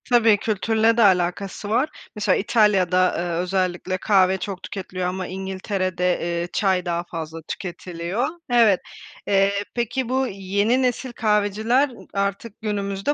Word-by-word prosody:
Tabii, 230 -4 +5
kültürle 225 +2 +1
de - - +4
alakası 190 +1 +1
var, 250 +8 +2 0.3
mesela 210 -3 +2
İtalya'da, 190 -4 +3
ııı, 175 0 -2
özellikle 185 0 -1
kahve 190 -1 +3
çok 190 -1 -6
tüketiliyor 185 -2 -4
ama 185 0 -3
İngiltere'de, 185 -1 -2
eee, 170 0 -2
çay 190 -3 +1
daha 170 -1 -1
fazla 165 -1 -5
tüketiliyor. 180 +4 -3 0.2
Evet, 225 -6 +5 0.5
eee, 195 0 +3 0.2
peki, 240 +1 -1
bu 260 +1 +1
yeni 200 +5 0
nesil 255 0 -1
kahveciler, 220 +5 +2
ııı, 245 - -13
artık 200 +3 -3
günümüzde 200 +3 -1
195 Hz, 135 wpm, -23 LUFS, 185-220 Hz, 0.5 s, Tabii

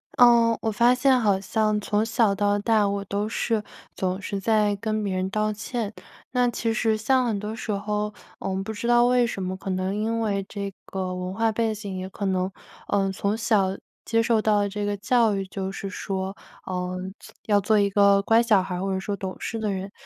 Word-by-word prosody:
呃， 235 -2 +6
我 220 - 0
发 235 +4 +4
现 260 0 +4
好 205 -4 +2
像 215 +1 0
从 210 +1 0
小 225 -2 +2
到 205 0 +1
大 215 0 +2
我 200 0 -2
都 205 +2 -2
是 225 -1 -1 0.3
总 185 0 -1
是 200 -1 -3
在 210 0 +2
跟 215 +1 -2
别 195 -2 -1
人 185 0 -1
道 215 +1 0
歉。 220 0 -4 0.4
那 250 0 +2
其 230 -1 -1
实 220 -1 +1
像 255 +4 +2
很 220 -3 0
多 210 +2 -5
时 225 -1 -4
候， 210 +1 -2 0.3
嗯， - - -3
我 195 - -2
不 220 - -5
知 220 +2 -4
道 240 0 +5
为 245 -1 +3
什 195 -4 -4
么， 185 0 -3
可 195 - -7
能 185 +1 -1
因 225 +2 -1
为 200 -3 0
这 200 -1 -5
个 185 -1 -3
文 180 0 -4
化 225 +2 +1
背 225 0 0
景， 200 -3 -6
也 185 0 -5
可 200 +1 -5
能 185 0 0 0.4
呃 195 -1 +1
从 200 +2 -1
小 200 -4 +1 0.3
接 230 0 +2
受 225 -1 +2
到 210 -1 +3
的 200 - 0
这 205 +1 -3
个 205 0 -1
教 225 +1 +2
育， 195 0 -2
就 190 0 -4
是 195 0 -5
说， 190 +1 -4 0.4
嗯， 185 +1 -3 0.3
要 205 -2 +4
做 215 +2 +2
一 200 -1 +3
个 200 0 +5
乖 225 +3 +4
小 215 -5 +4
孩 185 - -4
儿 180 - -3
或 195 0 -1
者 190 - -1
说 200 +1 -3
懂 190 -1 -5
事 225 - -4
的 215 -2 -1
人。 195 0 -4
205 Hz, 240 characters per minute, -25 LUFS, 195-225 Hz, 0.4 s, 呃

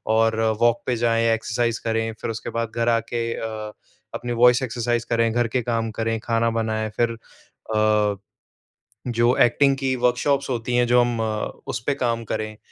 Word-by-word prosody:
और 115 0 +2 0.2
वॉक 120 0 +3
पे 125 - 0
जाएँ 115 0 +1
एक्सरसाइज़ 115 +1 -1
करें 115 0 -1
फ़िर - - -2
उसके 110 - -6
बाद 115 -1 -2
घर 115 0 +1
आके 115 0 0
अ, 110 -1 -5 0.4
अपनी 120 0 -4
वॉइस 125 +2 +5
एक्सरसाइज़ 120 -1 -1
करें, 115 -1 +2
घर 120 0 +1
के 125 +2 -1
काम 115 -1 -1
करें, 115 +1 -2
खाना 115 +1 0
बनाएँ। 110 -1 -1
फ़िर 120 -1 +2
अ, 110 -2 -1 0.9
जो 120 +1 +2
एक्टिंग 135 +3 +3
की 135 -1 -1
वर्कशॉप्स 135 +3 +1
होती 120 0 -2
हैं 120 0 +3
जो 125 +1 +4
हम 120 -1 0
अ, 110 -1 -2 0.2
उस - - -3
पे 140 - +2
काम 115 -3 -1
करें 110 -1 -4
115 Hz, 175 wpm, -23 LUFS, 115-120 Hz, 0.9 s, वॉइस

